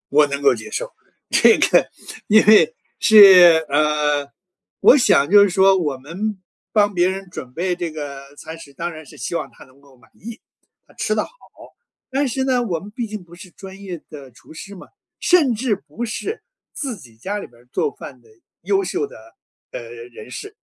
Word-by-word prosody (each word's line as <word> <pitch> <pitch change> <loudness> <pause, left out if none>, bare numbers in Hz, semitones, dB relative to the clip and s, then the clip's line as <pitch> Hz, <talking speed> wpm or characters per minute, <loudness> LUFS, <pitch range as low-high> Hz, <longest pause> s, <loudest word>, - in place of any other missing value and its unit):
我 150 +1 +4
能 140 0 -4
够 140 -2 +4
接 115 -2 -9
受， - - -5 0.4
这 - - +5
个 - - +2 0.4
因 215 +1 +5
为 215 - +5 0.2
是 180 -6 +7
呃， 150 -1 0 0.5
我 275 - +7
想 145 - +3
就 205 0 +8
是 200 - +4
说， 190 +1 +4
我 150 -6 -2
们 185 +10 -5 0.4
帮 205 -1 +2
别 175 -1 +2
人 190 0 -5
准 125 -8 -9
备 180 +5 -2
这 175 -2 -4
个 140 -2 -9
餐 160 +2 -10
食， 140 -4 -14
当 170 +5 -5
然 155 -1 -11
是 - - -15
希 - - -5
望 - - -4
他 - - -16
能 130 +1 -23
够 140 -1 -22
满 125 - -26
意， 230 +2 -11 0.4
他 - - -23
吃 - - -2
得 - - 0
好。 - - -12 0.8
但 275 +2 -1
是 265 +2 -2
呢， 255 -2 +1
我 190 -8 -2
们 205 - -12
毕 230 +1 -5
竟 210 -3 -8
不 175 -1 -19
是 185 +1 -13
专 195 +1 -12
业 180 -5 -8
的 140 -3 -11
厨 120 - -18
师 200 +5 -10
嘛， 185 - -14 0.3
甚 305 -10 +3
至 225 -2 -1
不 235 - -9
是 340 - -5 0.3
自 260 -6 -5
己 120 -10 -17
家 190 - -5
里 - - -9
边 120 0 -23
儿 - - -26
做 445 - -1
饭 - - -11
的 - - -25 0.4
优 390 -1 +1
秀 390 +3 -3
的 - - -15 0.6
呃， - - -6
人 455 -2 -12
士。 410 +1 -9
190 Hz, 215 characters per minute, -20 LUFS, 150-235 Hz, 0.8 s, 就